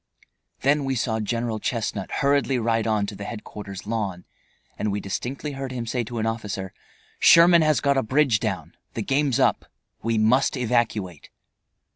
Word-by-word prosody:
Then 145 +2 +2
we 135 -1 -1
saw 110 -2 -1
General 115 +1 -2
Chestnut 105 -4 -3
hurriedly 140 -1 +1
ride 115 -1 0
on 105 -2 +1
to 100 - -6
the 100 - -7
headquarter's 105 -3 -8
lawn, 100 -5 -3 0.5
and 105 - -2
we 100 - -1
distinctly 125 +9 -4
heard 135 -1 -5
him 120 -2 -4
say 120 +1 -1
to 120 +2 -6
an 110 - -1
officer, 105 -4 -4 0.5
"Sherman 170 0 +7
has 155 -1 +2
got 140 -1 +2
a - - +3
bridge 130 -1 +2
down. - - -4 0.2
The - - -2
game's 140 -2 +1
up. - - +2 0.4
We 115 0 0
must 125 +6 +3
evacuate." 110 - -1
115 Hz, 165 wpm, -24 LUFS, 105-135 Hz, 0.5 s, Sherman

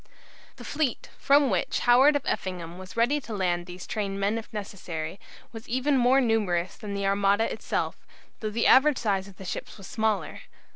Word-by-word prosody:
The - - -11
fleet, 290 -5 -2
from 280 -2 +4
which 185 - 0
Howard 260 +5 +6
of 285 - 0
Effingham 180 -2 -4
was 185 +3 -11
ready 265 +6 +2
to 225 -4 -6
land 175 -2 -1
these 180 0 -8
trained 200 -2 -3
men 205 +3 0
if 225 - -12
necessary, 185 -5 -6 0.3
was 225 0 -10
even 260 +4 +1
more 255 +1 +4
numerous 205 -8 0
than 205 -1 -6
the 200 0 -2
Armada 200 +2 +2
itself, - - -2 0.4
though 215 - -3
the 230 +2 -1
average 275 +1 +6
size 195 -4 -1
of 195 - -15
the 190 - -10
ships - - -6
was 195 - -11
smaller. 220 +1 -1
210 Hz, 185 wpm, -27 LUFS, 190-245 Hz, 0.4 s, Howard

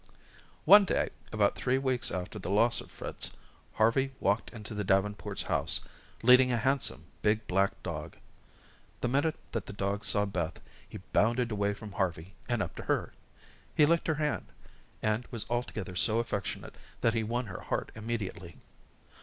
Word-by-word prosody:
One 205 +5 +10
day, 195 - 0 0.2
about 105 -2 +3
three 125 +1 +1
weeks 130 -2 +1
after 90 +4 -4
the 95 - -5
loss 115 +4 +3
of - - -13
Fritz, - - -5 0.4
Harvey 130 +5 +2
walked 100 +3 +1
into 110 -1 -8
the 105 -1 -2
Davenports' 95 -1 0
house, - - +2 0.4
leading 125 +1 +7
a 120 - +2
handsome, 115 - 0 0.2
big 105 +1 +2
black 95 +2 +1
dog. - - -5 0.8
The - - +1
minute 145 +6 +1 0.2
that - - -3
the - - -6
dog 100 +1 -2
saw 100 +1 +2
Beth, 90 -4 -3 0.3
he - - -7 0.2
bounded 120 +2 +3
away 100 -1 0
from 105 0 -9
Harvey, 90 -2 -2 0.2
and 120 -3 +1
up - - -6
to - - -5
her. - - 0 0.6
He 150 - +6
licked 170 +2 +2
her 160 - +2
hand, 150 0 -1 0.6
and 110 +3 0
was 115 -3 -4
altogether 120 -5 -3
so 110 +5 +4
affectionate 115 -4 -3 0.3
that 115 - +3
he 115 - +1
won 120 +3 -1
her 95 -4 -7
heart - - -2
immediately. 105 -6 -5
110 Hz, 165 wpm, -30 LUFS, 100-125 Hz, 0.8 s, One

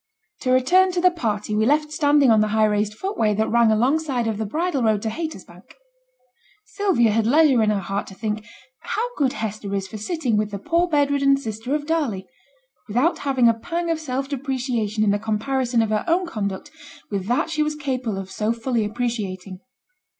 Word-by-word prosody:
To 255 - -3
return 360 +9 +4
to 355 - 0
the 365 +1 +4
party 215 -10 -2
we 215 +1 +2
left 300 +2 +2
standing 290 -4 +4
on 220 -1 +5
the 215 - +2
high 215 +1 +2
raised 210 0 0
footway 225 - -1
that 220 +2 0
ran 235 -1 +4
alongside 255 +3 +1
of 220 -2 -2
the 220 - -2
bridle 315 - -1
road 215 -3 +1
to 220 - -1
Haytersbank. 320 +7 -8 0.9
Sylvia 370 - +1
had 220 +1 +1
leisure 285 -2 +5
in 215 - +2
her 210 - +1
heart 195 +2 -3
to 190 - -11
think 215 0 -3 0.4
'how 455 +3 -2
good 270 -3 +1
Hester 210 -2 -4
is 195 -1 -2
for 215 - -8
sitting 255 - -1
with 210 0 0
the 205 - -5
poor 335 - +1
bed 290 -4 +2
ridden 275 -1 +3
sister 230 +1 -4
of 295 -1 -3
Darley!' 290 -12 -1 0.6
without 250 - +1
having 265 -4 +2
a 230 - +5
pang 335 +8 -3
of 325 - -1
self 270 -3 -3
depreciation 250 -6 -2
in 205 - +3
the 205 - 0
comparison 230 +3 0
of 220 - -2
her 215 - 0
own 350 +2 +2
conduct 215 - -4 0.4
with 195 -2 -3
that 245 +7 0
she 305 -2 0
was 300 0 0
capable 255 -8 -3
of 190 0 -6
so 215 +2 -1
fully 235 0 -1
appreciating. 210 -5 -4
240 Hz, 200 wpm, -22 LUFS, 215-295 Hz, 0.9 s, on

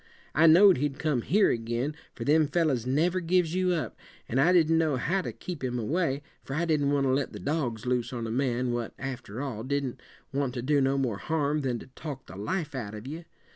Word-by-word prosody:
I 165 +3 +5
know'd 185 +3 +8
he'd 140 +1 -1
come 145 -4 0
here 200 - +3
ag'in, 120 +5 -2 0.2
for - - -5
them 155 +1 +4
fellers 145 -7 +1
never 165 +8 +2
gives 175 -1 +1
you 185 0 +2
up; 165 - -3 0.3
and 130 +4 +1
I 170 +5 +5
didn't 165 -2 +4
know 155 -4 +2
how 180 +9 0
to - - -4
keep 175 -6 -7
him 125 -1 -1
away, 145 +3 0 0.2
for 135 - -5
I 170 +3 +1
didn't 150 -4 +2
want 140 -1 +2
to 130 - +2
let 135 0 -1
the - - -7
dogs 130 -7 -2
loose 125 -1 0
on 120 -3 -4
a 110 - -3
man 125 0 0
what, 120 -1 -3
after 130 -3 -5
all, 115 -6 -4
didn't 135 -1 -2 0.3
want 135 -2 -1
to 120 - -3
do 145 +1 +3
no 135 +1 +2
more 120 -7 -1
harm 150 +1 0
than 130 -3 -1
to - - -10
talk 145 -4 -7
the 95 - -11
life 150 - -3
out 110 -5 -5
of 105 +2 -8
you. 160 +5 -7
140 Hz, 230 wpm, -28 LUFS, 125-160 Hz, 0.3 s, know'd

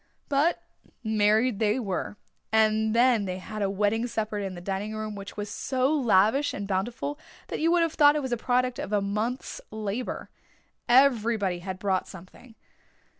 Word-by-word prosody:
But 290 +4 +1 0.4
married 220 +1 +2
they 215 +2 +2
were, 205 -2 -3 0.3
and 220 0 +3
then 235 -3 +4
they 185 -1 -3
had 215 +3 -7
a 200 - +1
wedding 210 +4 0
supper 215 -2 -3
in 195 -2 -4
the - - -7
dining 195 +4 -4
room 215 0 -4
which 200 0 -9
was 205 0 -3
so 260 +6 0
lavish 245 0 +3
and 200 0 -5
bountiful 235 +9 -2 0.3
that - - -3
you 325 - +2
would 345 -1 +4
have 330 -1 -1
thought 290 -1 +6
it 300 - 0
was 260 - -4
the 240 - +1
product 250 +1 0
of - - -5
a 210 - +3
month's 215 +6 -3
labour. 215 +3 -4 0.6
Everybody 230 -7 +3
had 185 +1 -6
brought 190 -1 -1
something. 190 +6 -13
215 Hz, 175 wpm, -27 LUFS, 200-250 Hz, 0.6 s, thought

